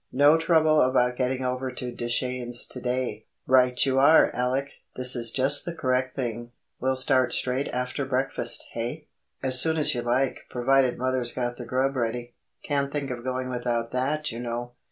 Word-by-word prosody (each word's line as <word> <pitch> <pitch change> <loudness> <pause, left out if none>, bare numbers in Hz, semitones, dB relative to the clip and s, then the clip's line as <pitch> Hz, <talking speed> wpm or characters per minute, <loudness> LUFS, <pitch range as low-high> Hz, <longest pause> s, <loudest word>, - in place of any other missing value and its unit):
"No 145 +4 +5
trouble 160 -2 +3
about 125 -1 +2
getting 130 0 -1
over 130 +1 -2
to 125 0 -4
Deschenes 120 0 -1
to 125 - -8
day." 125 -3 -3 0.2
"Right 125 -1 +3
you 135 -1 +1
are, 150 +4 +6
Alec! 130 +3 -1 0.2
This 125 0 +3
is 120 -1 0
just 135 +4 +2
the 170 -1 -6
correct 130 -2 -1
thing. 120 -2 -4 0.3
We'll 130 0 0
start 130 -1 +3
straight 130 +2 -1
after 125 +3 -3
breakfast—hey?" 135 +1 -1 0.4
"As 130 -1 +6
soon 160 0 +1
as 150 - +3
you 120 - -2
like, 125 +3 0
provided 130 +1 +2
mother's 130 -1 -1
got 120 -1 -3
the - - -7
grub 135 +2 0
ready. 120 0 -3 0.3
Can't 140 -1 -1
think 140 -2 -3
of 120 -1 -6
going 130 0 -3
without 120 -1 -2
that, 145 +4 -1
you 115 - -7
know." 120 0 -4
130 Hz, 175 wpm, -25 LUFS, 125-135 Hz, 0.4 s, are